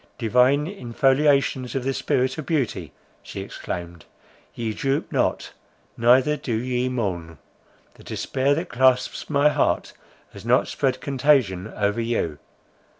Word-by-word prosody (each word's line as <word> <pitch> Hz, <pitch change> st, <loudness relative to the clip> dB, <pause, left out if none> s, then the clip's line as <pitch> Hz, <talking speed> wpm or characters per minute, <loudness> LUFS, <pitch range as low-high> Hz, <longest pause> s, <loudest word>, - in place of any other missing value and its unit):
—"Divine 125 Hz, +5 st, +3 dB
infoliations 135 Hz, -, +1 dB
of 135 Hz, -, -1 dB
the 135 Hz, +1 st, -1 dB
spirit 130 Hz, +2 st, 0 dB
of 155 Hz, -, -6 dB
beauty," 120 Hz, -, -1 dB, 0.3 s
she -, -, -7 dB
exclaimed, 85 Hz, -2 st, -7 dB, 0.5 s
"Ye 115 Hz, -2 st, -3 dB
droop 135 Hz, +5 st, -1 dB
not, -, -, -1 dB, 0.4 s
neither 130 Hz, +5 st, +4 dB
do 120 Hz, -6 st, -3 dB
ye 125 Hz, +2 st, -1 dB
mourn; 90 Hz, -, -3 dB, 0.6 s
the -, -, -17 dB
despair 135 Hz, +2 st, 0 dB
that 165 Hz, +4 st, -3 dB
clasps 130 Hz, +1 st, +1 dB
my 145 Hz, 0 st, +4 dB
heart, -, -, 0 dB, 0.4 s
has -, -, -11 dB
not -, -, +3 dB
spread 130 Hz, -1 st, -1 dB
contagion 130 Hz, -9 st, +1 dB
over 105 Hz, +2 st, 0 dB
you! 115 Hz, -10 st, -2 dB
125 Hz, 130 wpm, -23 LUFS, 110-140 Hz, 0.6 s, neither